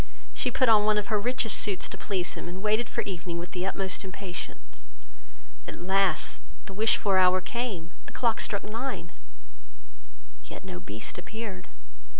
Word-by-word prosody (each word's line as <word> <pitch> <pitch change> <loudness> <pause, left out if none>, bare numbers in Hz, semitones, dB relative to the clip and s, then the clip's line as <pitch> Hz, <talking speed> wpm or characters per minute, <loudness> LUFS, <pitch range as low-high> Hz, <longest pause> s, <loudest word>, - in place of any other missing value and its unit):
She - - +1
put 255 - +3
on 215 -2 +7
one 215 0 +4
of 210 +1 -1
her 210 - +4
richest 245 +1 +2
suits 200 -3 +3
to - - -6
please 190 -3 -2
him, - - -6
and 185 +3 -7
waited 215 +2 +2
for - - -1
evening 175 -3 -4
with 175 +1 -5
the 185 +1 -2
utmost 195 0 -1
impatience; 190 -1 -7 0.9
at - - -6
last 190 +1 +2 0.2
the 195 - -8
wished 220 +3 +4
for 195 -3 +3
hour 185 0 +6
came, 190 -4 -3 0.2
the - - -7
clock 230 -3 +2
struck 200 - 0
nine, 220 -5 -4 1.3
yet - - -9
no 90 - -6
Beast 110 - -6
appeared. 210 0 -6
195 Hz, 165 wpm, -28 LUFS, 180-215 Hz, 1.3 s, on